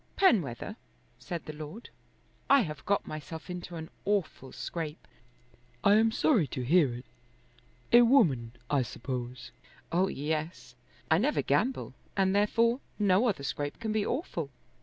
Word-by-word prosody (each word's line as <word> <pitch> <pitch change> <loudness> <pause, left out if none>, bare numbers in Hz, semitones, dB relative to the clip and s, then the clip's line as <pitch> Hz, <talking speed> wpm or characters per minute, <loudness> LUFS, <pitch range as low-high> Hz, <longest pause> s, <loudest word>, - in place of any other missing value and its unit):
"Penwether," 210 - +2 0.4
said 175 -3 -6
the 155 - -6
Lord, 155 +9 -9 0.6
"I 275 -1 +7
have 150 - -5
got 200 +1 +2
myself 160 +3 -7
into 180 -1 -6
an 160 +1 -7
awful 190 -10 -1
scrape." 160 -3 -5 0.8
"I 200 - +6
am 225 +1 +5
sorry 220 - +3
to 130 0 -4
hear 155 -1 +4
it. 125 +2 -9 0.9
A 240 - +10
woman, 165 - +4
I 140 0 +2
suppose." 120 0 -5 0.4
"Oh, 185 +3 +3
yes. 155 -2 -3 0.4
I 160 - +6
never 285 +8 +1
gamble, 255 +4 0 0.2
and 190 0 +3
therefore 230 +4 +3 0.2
no 205 +3 +3
other 195 -11 -1
scrape 145 +1 -3
can 220 -1 -2
be 215 -1 +1
awful. 205 - -3
175 Hz, 140 wpm, -30 LUFS, 145-215 Hz, 0.9 s, A